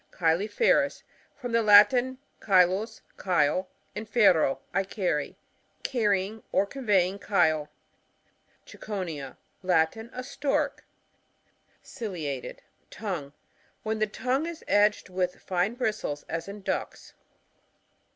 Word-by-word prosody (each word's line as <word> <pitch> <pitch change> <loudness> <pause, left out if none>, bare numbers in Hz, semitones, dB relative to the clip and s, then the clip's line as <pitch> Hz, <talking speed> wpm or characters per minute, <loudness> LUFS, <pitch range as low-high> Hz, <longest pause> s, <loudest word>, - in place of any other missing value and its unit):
CiiYUFEROos.— 205 - +2 0.3
From 250 -4 -6
the 230 0 +3
Latin, 225 +5 +6 0.3
cAy 185 -3 +6
/u», 195 +6 -4 0.2
chyle, 180 0 +2 0.3
aud/ero, 210 - +3
I 195 - +2
carry. 180 -7 -2 0.5
Carry 205 -7 +1
ing 215 +2 -10
or 195 - +3
conveying 200 -6 +1
chyle. 155 -7 +2 1.0
CicoNiA. 165 -10 -6
— - - -43
Latin. 180 +8 +1
A 255 - -6
Stork. 275 +1 -1 1.0
Ciliated 160 - -5 0.3
(tongue) 170 -10 -5 0.3
— - - -37
Wht 215 - -1
n 220 - -1
the 215 - +2
tongue 255 +8 -1
is 335 -1 -7
edged 205 -1 +3
with 180 -1 -2
fine 185 +5 -1
bristles, 215 - -2
as 165 +2 -4
in 200 0 -8
ducks. - - -4
200 Hz, 115 wpm, -27 LUFS, 175-225 Hz, 1.0 s, Latin